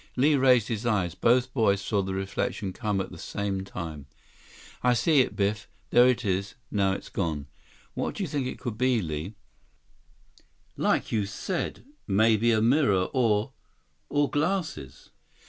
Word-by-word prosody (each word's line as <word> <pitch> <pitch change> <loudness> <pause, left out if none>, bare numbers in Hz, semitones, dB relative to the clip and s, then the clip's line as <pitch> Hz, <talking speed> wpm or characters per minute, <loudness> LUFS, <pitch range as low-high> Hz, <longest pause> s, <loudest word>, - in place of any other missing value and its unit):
Li 145 +4 +4
raised 130 -5 +4
his 115 -1 -3
eyes. 100 -8 0
Both 125 +6 +2
boys 105 -6 +2
saw 100 0 0
the 95 0 -3
reflection 95 0 -3
come 105 -3 -1
at 95 - -4
the 85 - -10
same 100 0 -3
time. 80 -7 -7 0.7
"I 125 0 +3
see 155 +4 +3
it, - - -2
Biff. 105 0 -1 0.2
There 120 +1 +7
it 120 -2 +1
is. 100 0 -1 0.2
Now 100 -2 +2
it's - - -6
gone." 80 -6 -2 0.5
"What - - -3
do 205 - -3
you - - -2
think 140 -3 -2
it - - -5
could 115 -2 -5
be, 130 -2 +3
Li?" 80 +2 -4 1.4
"Like - - 0
you 105 -3 0
said, 170 - -4 0.2
maybe 110 +3 +3
a 110 -1 +2
mirror 115 -8 +3
or—or 130 +4 -1
glasses." 155 - -2
105 Hz, 155 wpm, -27 LUFS, 95-125 Hz, 1.4 s, There